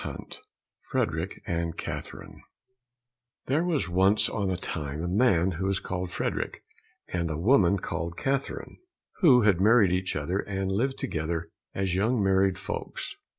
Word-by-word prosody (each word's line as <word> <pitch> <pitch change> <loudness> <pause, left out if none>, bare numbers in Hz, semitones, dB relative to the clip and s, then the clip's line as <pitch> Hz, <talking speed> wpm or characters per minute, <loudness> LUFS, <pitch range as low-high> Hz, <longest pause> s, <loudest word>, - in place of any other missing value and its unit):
59 - - -6 0.6
Frederick 80 +4 -2
and 85 -1 -2
Catherine - - -7 1.0
There 145 +6 +1
was 165 - 0
once 95 +4 +4
on 100 -3 -1
a 95 - -1
time 75 -3 -4
a - - -1
man 95 -2 +3
who 95 +3 -2
was 100 0 +1
called 90 0 -4
Frederick - - -3 0.5
and 85 -2 -1
a 80 - -2
woman 100 - +4
called 85 -2 -4
Catherine, 135 0 -3 0.4
who 130 - +6
had 100 -4 +3
married 105 -2 +5
each 90 0 -1
other 85 +6 -1
and 95 -1 -2
lived 130 +7 0
together 80 +1 -3 0.2
as 95 -2 -1
young 110 +6 +1
married 95 -1 +3
folks. - - -5
95 Hz, 150 wpm, -27 LUFS, 85-105 Hz, 1.0 s, who